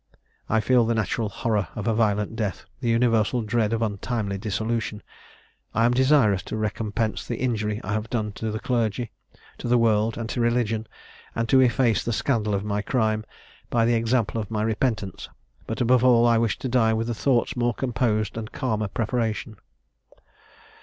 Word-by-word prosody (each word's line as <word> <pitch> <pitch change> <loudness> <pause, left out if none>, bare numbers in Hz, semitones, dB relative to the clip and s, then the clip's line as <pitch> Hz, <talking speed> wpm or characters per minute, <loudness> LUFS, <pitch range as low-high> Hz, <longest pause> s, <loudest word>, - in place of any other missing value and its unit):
I 110 0 +3
feel 125 +1 +4
the 115 - +1
natural 110 +1 -1
horror 105 0 -1
of 105 - -4
a 115 - +3
violent 105 -1 +1
death, 105 -4 -3
the 120 -3 -1
universal 115 0 +2
dread 110 0 0
of 115 0 0
untimely 100 -1 -2
dissolution. 110 +1 -2 0.7
I 115 - +4
am 120 - +3
desirous 130 -7 +4
to - - -4
recompense 110 +1 -2
the 120 - -4
injury 110 -4 -1
I - - -3
have 110 +1 -2
done 110 -3 -1
to 110 +2 -4
the 110 0 -3
clergy, 120 -1 -1 0.5
to - - -4
the 120 +1 +4
world, 110 -1 +2
and 115 -1 -3
to 120 - -2
religion, 115 -2 0 0.5
and 115 0 -1
to 130 +2 +6
efface 120 -2 +3
the 120 - -1
scandal 110 -5 0
of 100 +1 -2
my 105 0 -1
crime, 110 -2 0 0.5
by 115 -1 +2
the 120 - +3
example 115 -1 +1
of 105 - -7
my 110 -1 -1
repentance: 110 -2 -2 0.4
but, 115 +3 -3
above 125 0 +4
all, 120 -2 +5
I 115 -1 +4
wish 115 -3 0
to - - -4
die 115 -3 +3
with 115 +1 -1
thoughts 120 +1 +1
more 120 -2 0
composed, 115 -5 -1
and 110 +1 -5
calmer 110 -6 -1
preparation. 110 0 -2
115 Hz, 180 wpm, -25 LUFS, 105-120 Hz, 0.7 s, to